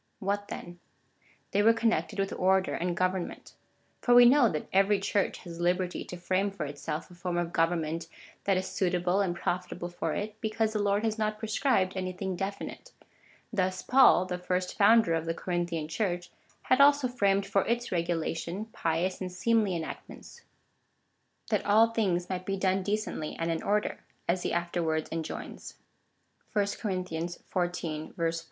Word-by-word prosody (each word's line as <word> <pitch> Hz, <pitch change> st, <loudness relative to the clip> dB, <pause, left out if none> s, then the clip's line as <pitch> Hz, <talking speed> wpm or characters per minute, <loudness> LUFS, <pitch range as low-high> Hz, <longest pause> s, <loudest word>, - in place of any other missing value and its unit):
What 205 Hz, +1 st, -2 dB
then? 175 Hz, 0 st, -8 dB, 0.7 s
They 200 Hz, -, +3 dB
were 225 Hz, +2 st, +5 dB
connected 215 Hz, -9 st, 0 dB
with 195 Hz, 0 st, -1 dB
order 190 Hz, +1 st, +2 dB
and 175 Hz, 0 st, -2 dB
government. 185 Hz, -1 st, -2 dB, 0.5 s
For 245 Hz, -, +4 dB
we 245 Hz, 0 st, +10 dB
know 250 Hz, -1 st, +6 dB
that 150 Hz, -, -3 dB
every 195 Hz, +1 st, +4 dB
Church 200 Hz, 0 st, 0 dB
has 170 Hz, -2 st, -8 dB
liberty 180 Hz, +1 st, 0 dB
to 180 Hz, -, -7 dB
frame 185 Hz, +3 st, 0 dB
for 195 Hz, -6 st, -5 dB
itself 145 Hz, +4 st, -5 dB
a -, -, -12 dB
form 175 Hz, 0 st, -3 dB
of 175 Hz, -1 st, -2 dB
government 165 Hz, -1 st, 0 dB, 0.4 s
that 195 Hz, -2 st, +3 dB
is 185 Hz, -, -1 dB
suitable 180 Hz, 0 st, +1 dB
and 180 Hz, -3 st, 0 dB
profitable 175 Hz, 0 st, -3 dB
for 175 Hz, -, -3 dB
it, 215 Hz, +1 st, -5 dB
because 220 Hz, 0 st, 0 dB
the 210 Hz, -, 0 dB
Lord 205 Hz, +1 st, +1 dB
has 220 Hz, 0 st, -1 dB
not 215 Hz, 0 st, 0 dB
pre 220 Hz, -, -5 dB
scribed 210 Hz, -6 st, +2 dB
anything 185 Hz, 0 st, -3 dB
definite. 200 Hz, -, -5 dB, 0.6 s
Thus 185 Hz, -2 st, 0 dB
Paul, 255 Hz, -8 st, +6 dB
the 180 Hz, -1 st, -4 dB
first 180 Hz, 0 st, -2 dB
founder 210 Hz, -3 st, +5 dB
of 165 Hz, 0 st, -1 dB
the 165 Hz, -, -1 dB
Corinthian 175 Hz, -3 st, -2 dB
Church, 175 Hz, -1 st, -2 dB, 0.3 s
had 255 Hz, +2 st, +4 dB
also 285 Hz, -2 st, +6 dB
framed 200 Hz, -5 st, +1 dB
for 195 Hz, 0 st, +2 dB
its 240 Hz, +1 st, -1 dB
regulation 170 Hz, +2 st, -2 dB
pious 170 Hz, +4 st, -1 dB
and 185 Hz, -1 st, -3 dB
seemly 205 Hz, +1 st, +1 dB
enactments 170 Hz, -, -8 dB, 0.5 s
— -, -, -27 dB
that -, -, +2 dB
all 220 Hz, +3 st, +5 dB
things 185 Hz, -6 st, 0 dB
might 185 Hz, -1 st, -4 dB
be 195 Hz, 0 st, -1 dB
done 190 Hz, 0 st, +1 dB
decently 205 Hz, -6 st, -2 dB
and 165 Hz, 0 st, -1 dB
in 165 Hz, -, -2 dB
order, 210 Hz, +1 st, 0 dB, 0.3 s
as 175 Hz, +1 st, +1 dB
he -, -, -2 dB
afterwards 170 Hz, -2 st, -1 dB
enjoins. 165 Hz, -1 st, -6 dB, 0.8 s
(1 205 Hz, -2 st, +3 dB, 0.2 s
Cor. 210 Hz, -, -1 dB
xiv. 175 Hz, -2 st, -3 dB
40.) 175 Hz, -4 st, -3 dB
185 Hz, 165 wpm, -29 LUFS, 175-205 Hz, 0.8 s, we